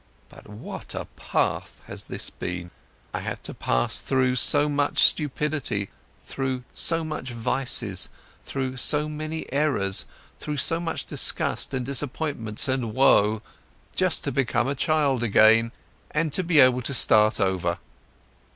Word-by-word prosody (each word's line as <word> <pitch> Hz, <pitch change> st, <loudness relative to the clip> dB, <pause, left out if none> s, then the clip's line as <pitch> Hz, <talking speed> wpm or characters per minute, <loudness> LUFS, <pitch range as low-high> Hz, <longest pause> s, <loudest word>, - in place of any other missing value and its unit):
But -, -, -15 dB
what 105 Hz, +1 st, -8 dB
a -, -, -4 dB
path -, -, -2 dB
has -, -, -5 dB
this -, -, -5 dB
been! 90 Hz, -1 st, -5 dB, 0.4 s
I -, -, -2 dB
had -, -, -6 dB
to -, -, -2 dB
pass -, -, -1 dB
through 130 Hz, -1 st, +1 dB
so 145 Hz, +4 st, +4 dB
much 145 Hz, -1 st, +2 dB
stupidity, 150 Hz, -, +1 dB, 0.3 s
through 130 Hz, -2 st, -3 dB
so 165 Hz, 0 st, +2 dB
much 155 Hz, -4 st, -5 dB
vice, 115 Hz, -4 st, -1 dB, 0.3 s
through 130 Hz, -1 st, -4 dB
so 150 Hz, +4 st, +2 dB
many 155 Hz, +1 st, -5 dB
errors, 140 Hz, -10 st, 0 dB, 0.3 s
through 150 Hz, -1 st, -4 dB
so 165 Hz, +4 st, +1 dB
much 170 Hz, -1 st, -3 dB
disgust -, -, 0 dB
and 125 Hz, -2 st, -2 dB
disappointments 140 Hz, -5 st, -2 dB
and 125 Hz, -4 st, -2 dB
woe, 110 Hz, -5 st, +4 dB, 0.5 s
just 185 Hz, -2 st, +1 dB
to 140 Hz, -, -1 dB
become 120 Hz, -2 st, 0 dB
a 140 Hz, -, 0 dB
child 140 Hz, -3 st, +1 dB
again 115 Hz, +1 st, +5 dB, 0.4 s
and 155 Hz, -1 st, -1 dB
to 185 Hz, -, +4 dB
be 165 Hz, -3 st, +3 dB
able 130 Hz, -1 st, +6 dB
to 140 Hz, +3 st, -3 dB
start 110 Hz, -3 st, +4 dB
over. 90 Hz, -3 st, 0 dB
130 Hz, 140 wpm, -25 LUFS, 110-150 Hz, 0.5 s, able